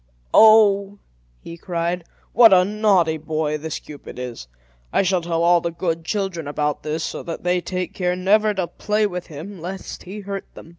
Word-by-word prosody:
"Oh!" 205 -2 +6 0.4
he 170 - -9
cried, 170 0 -3 0.3
"what 230 -1 +7
a 180 -1 +6
naughty 195 -6 +2
boy 155 -1 -2
this 160 0 -4
Cupid 145 -4 -11
is! 125 - -7 0.4
I - - +2
shall 185 -1 +1
tell 165 0 -1
all 175 0 +4
the 170 - -2
good 165 -1 -3
children 190 -6 -3
about 150 0 -2
this, 155 +1 -3
so - - -4
that 165 - -7
they 180 0 +1
take 180 0 -4
care 180 -1 -1
never 210 +4 +3
to 190 -2 -1
play 210 +4 -1
with 180 -3 -4
him, 165 +4 -9
lest 190 +3 -7
he 200 +3 -8
hurt 195 0 -5
them." - - -12
180 Hz, 185 wpm, -21 LUFS, 165-195 Hz, 0.4 s, what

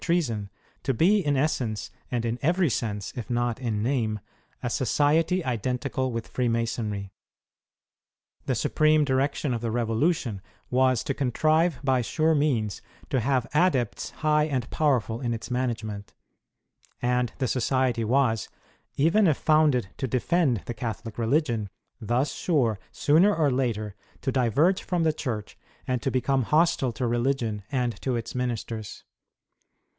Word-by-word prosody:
59 - - -7
treason, 115 - -2 0.3
to 135 - 0
be, 195 - +4
in 145 -2 +1
essence, 130 -7 -1 0.2
and 120 -2 -1
in 115 +1 -2
every 170 0 +2
sense, 105 -4 -3
if 120 - -6
not 120 0 0
in 110 -4 -1
name, 115 -4 0 0.4
a - - 0
society 155 - +2
identical 130 +2 -1
Avitli 115 -1 -3
Freemasonry. 115 -5 -2 1.4
The - - +1
supreme 155 0 +3
direction 135 0 0
of 115 - -3
the 115 - -2
Revolution 115 - 0 0.3
was 130 -1 +3
to 140 - -1
contrive 155 +5 +1
by 130 -2 +2
sure 160 +7 +1
means 130 -9 0 0.3
to 130 - +2
have 130 0 +1
adepts 150 - +1
high 150 -1 +1
and 130 -6 -2
powerful 125 -6 +1
in 120 -2 -1
its 115 - -8
management; 115 -5 -3 0.8
and 125 -1 +1
the 130 - 0
society 125 -1 +1
was, 115 -2 +1 0.5
even 170 +8 +4
if 155 - +3
founded 150 -9 +3
to 130 - -2
defend 130 - +1
the 120 - -4
Catholic 115 0 -5
religion, 115 -4 +1 0.3
thus 120 +6 0
sure, 125 - +1
sooner 175 +8 +4
or 150 -4 +2
later, 115 -5 -1 0.3
to 135 - 0
diverge 140 - +2
from 175 -2 -1
the 160 -1 +3
Church 115 -9 -5 0.3
and 125 -2 -1
to 135 - 0
become 130 +1 +1
hostile 155 0 +2
to 125 - -2
religion 120 -3 0
and 125 -4 -1
to 130 -2 -1
its 115 -1 -4
ministers. 115 -4 -4
125 Hz, 145 wpm, -26 LUFS, 115-145 Hz, 1.4 s, be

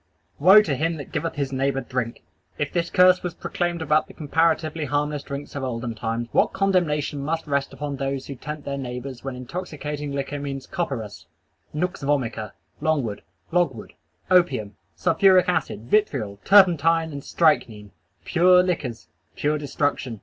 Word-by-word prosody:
"Woe 190 +8 +8
to 155 - -1
him 165 +5 0
that 145 - -9
giveth 165 - -2
his 140 -2 -2
neighbor 135 0 0
drink!" 125 -3 -4 0.3
If 145 - -2
this 170 -1 0
curse 185 -1 +5
was 175 -1 -4
proclaimed 175 -2 -2
about 155 0 +2
the - - -14
comparatively 160 0 0
harmless 145 +1 -1
drinks 140 +1 -7
of 140 - -3
olden 120 -2 -3
times, 115 +1 -3
what - - +2
condemnation 170 -7 +1
must 160 +2 -2
rest 140 -2 -1
upon 145 -2 -5
those 135 0 -3
who 140 - -6
tempt 150 +3 -7
their 140 0 -3
neighbors 125 0 -6
when 135 -1 -4
intoxicating 150 +1 -5
liquor 140 +1 -3
means 135 -2 -5
copperas, 110 - -4 0.4
nux 180 +4 -1
vomica, 120 -7 -1 0.3
logwood, 140 -10 0 1.1
opium, 170 - +3 0.2
sulphuric 185 +1 +4
acid, 140 - -1
vitriol, 120 - 0
turpentine, 165 -4 +5
and 140 -1 -7
strychnine! 115 -11 +1 0.3
"Pure 180 - +5
liquors:" 145 -10 -3 0.3
pure 150 +1 0
destruction! 145 -5 -2
145 Hz, 150 wpm, -24 LUFS, 130-165 Hz, 1.1 s, Woe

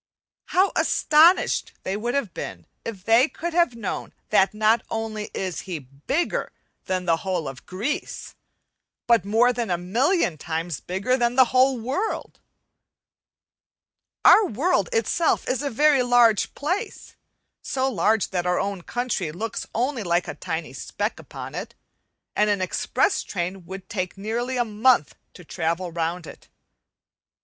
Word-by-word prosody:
How 375 +2 +3
astonished 320 +5 +4
they 190 - -2
would 240 +5 -2
have 230 -11 -1
been 85 -3 -7 0.2
if 200 -5 -7
they 230 +6 +5
could 345 +1 -5
have 340 -8 +2
known 220 -4 -5 0.2
that 190 - +4
not 215 +2 +3
only 220 -1 -4
is 185 -3 -3
he 175 - -2
bigger 145 - -3 0.3
than 185 -1 -2
the 165 -1 +3
whole 180 -3 -2
of 135 0 -9
Greece, 220 - -4 0.7
but 235 -4 +3
more 230 +4 +3
than 235 -3 -3
a 175 - +1
million 210 - +1
times 165 0 -3
bigger 195 +8 -1
than 240 -1 +1
the 260 0 +7
whole 260 0 +4
world! 270 - -3 1.9
Our 435 - +8
world 325 - +1
itself 455 -8 +1
is 260 +1 0
a 285 - -1
very 290 +2 +4
large 245 -3 +3
place, 370 +10 -4 0.5
so 265 0 -1
large 215 -2 +1
that 180 -1 -1
our 180 0 +2
own 195 -1 -2
country 235 -6 -2
looks 225 +7 -5
only 250 +1 0
like 175 -2 0
a - - -4
tiny 170 -2 -5
speck - - -4
upon - - -9
it, - - -6 0.6
and 210 0 +3
an 205 -1 +1
express 285 - 0
train 180 -1 -4
would 190 0 -8
take 185 -4 -4
nearly 235 +5 -2
a 240 - +2
month 215 - +3 0.2
to 180 - -13
travel 170 +2 -2
round 170 +1 -2
it. - - -12
220 Hz, 150 wpm, -24 LUFS, 180-255 Hz, 1.9 s, Our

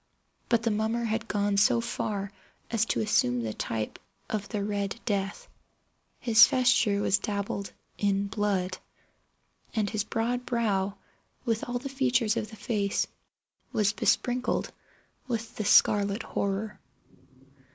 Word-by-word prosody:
But 235 -2 +3
the 230 - +2
mummer 220 +3 0
had 225 0 -1
gone 205 -1 0
so 235 +4 +4
far 210 -4 -3 0.4
as 225 -1 +2
to - - 0
assume 125 - +2
the 110 -1 -3
type 110 0 -3 0.3
of 210 -2 -2
the 210 -3 -2
Red 200 +1 -2
Death. 200 -2 -2 0.7
His 230 -2 +7
vesture 245 -5 +3
was 200 - +3
dabbled 200 -1 -3 0.3
in 200 -1 +1
blood—and 200 +1 -4
his 215 -2 0
broad 240 +3 -1
brow, 205 -5 0 0.5
with 225 -1 0
all 245 - 0
the 260 +3 -5
features 250 -5 +1
of 220 -3 -2
the 220 - -10
face, 205 -3 0 0.7
was 210 -1 +2
besprinkled 245 +3 +1 0.6
with 230 -2 -3
the 215 - -2
scarlet 205 +2 +4
horror. 200 +2 -2
215 Hz, 130 wpm, -28 LUFS, 200-230 Hz, 0.7 s, His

